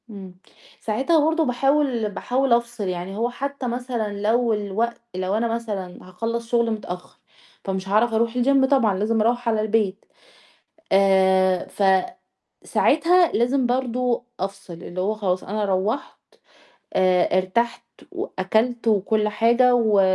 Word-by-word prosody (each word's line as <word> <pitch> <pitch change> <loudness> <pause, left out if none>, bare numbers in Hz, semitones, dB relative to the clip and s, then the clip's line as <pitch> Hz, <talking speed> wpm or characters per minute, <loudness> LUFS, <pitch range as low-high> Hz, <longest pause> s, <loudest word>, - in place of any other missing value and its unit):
امم، 190 -4 -10 0.5
ساعتها 265 +9 +1
برضه 320 0 +1
باحاول 260 -3 +1
باحاول 250 +5 0
أفصل، 235 -3 -1
يعني 180 +2 -4
هو 235 +2 0
حتّى 275 +1 -5
مثلًا 235 -4 -3
لو 230 +2 +2
الوقت 210 +3 -2
لو 185 +1 -2
أنا 235 +1 0
مثلًا 200 -6 -5
هاخلّص 230 +5 -4
شغل 235 -1 +1
متأخّر، 180 -4 -7 0.5
فمش 190 0 -4
هاعرف 220 +3 +2
أروح 230 +1 +1
الGym 270 +1 +4
طبعًا 225 -8 +3
لازم 220 +2 +1
أروّح 240 +2 +1
على 220 -1 +1
البيت، 215 -2 -1 0.9
آآ 190 -1 +3 1.0
فساعتها 345 +3 +3
لازم 250 +3 +1
برضه 245 -1 -1 0.2
أفصل، 195 -1 -5
اللي 175 +2 -7
هو 205 +4 0
خلاص 190 -4 -2
أنا 210 +2 -2
روّحت 200 +6 -2 0.8
آآ 185 -1 +2
ارتحت 235 +6 -1 0.3
وأكلت 225 +5 -1
وكلّ 210 +1 +1
حاجة 235 +4 +3
و 220 -4 +3
225 Hz, 130 wpm, -22 LUFS, 195-245 Hz, 1.0 s, الGym